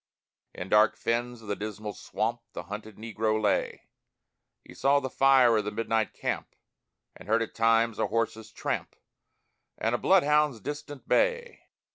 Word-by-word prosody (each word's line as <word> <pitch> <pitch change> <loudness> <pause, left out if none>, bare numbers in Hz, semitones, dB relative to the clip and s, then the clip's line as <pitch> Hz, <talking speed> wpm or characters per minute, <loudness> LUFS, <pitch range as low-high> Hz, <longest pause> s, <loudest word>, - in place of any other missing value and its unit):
In 90 - -6
dark 105 +1 +4
fens 120 0 -2
of - - -12
the 100 - -1
Dismal 105 +1 -6
Swamp 115 +5 -3
The - - -6
hunted 105 +1 -8
Negro 110 -1 -1
lay; 105 -2 0 0.8
He - - -14
saw 140 +2 +3
the 130 -2 -5
fire 135 -3 +5
of 105 - 0
the 105 - -3
midnight 110 0 -1
camp, - - -4 0.6
And 90 - -14
heard 115 +1 +3
at - - -8
times 115 0 +2
a - - +1
horse's 110 -1 -2
tramp - - -4 0.8
And 110 +2 -1
a 120 - 0
bloodhound's 150 -8 +3
distant 145 +2 -7
bay. 480 -1 0
115 Hz, 155 wpm, -28 LUFS, 110-135 Hz, 0.8 s, fire